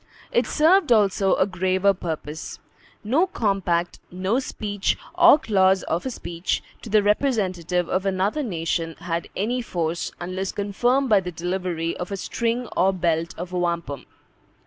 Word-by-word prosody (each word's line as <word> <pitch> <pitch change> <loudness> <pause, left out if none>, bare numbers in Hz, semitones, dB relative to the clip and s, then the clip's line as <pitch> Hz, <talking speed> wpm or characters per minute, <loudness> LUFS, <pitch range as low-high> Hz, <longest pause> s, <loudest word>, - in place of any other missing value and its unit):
It - - +2
served 320 0 +4
also 200 -3 +4
a - - +3
graver 190 +1 +1
purpose. 160 -4 -5 0.5
No 280 - +2
compact, 195 - -1
no 190 +7 0
speech, 205 -6 -2 0.2
or 350 -3 +7
clause 190 - +3
of 170 +10 -2
a - - -1
speech, 175 -7 -3 0.2
to 230 - -9
the 210 0 +4
representative 185 - +1
of 190 +1 -1
another 195 +9 0
nation, 165 - -2
had 170 -1 -4
any 240 +6 -1
force, 170 -6 -2
unless 185 +2 -3
confirmed 240 +7 +1
by 210 -2 +6
the 180 -1 -5
delivery 175 -1 -2
of 180 +2 -5
a 200 - -2
string 235 +5 -2
or 190 +1 +4
belt 170 -3 -1
of 175 +1 -6
wampum. 170 -5 -2
190 Hz, 145 wpm, -24 LUFS, 175-220 Hz, 0.5 s, or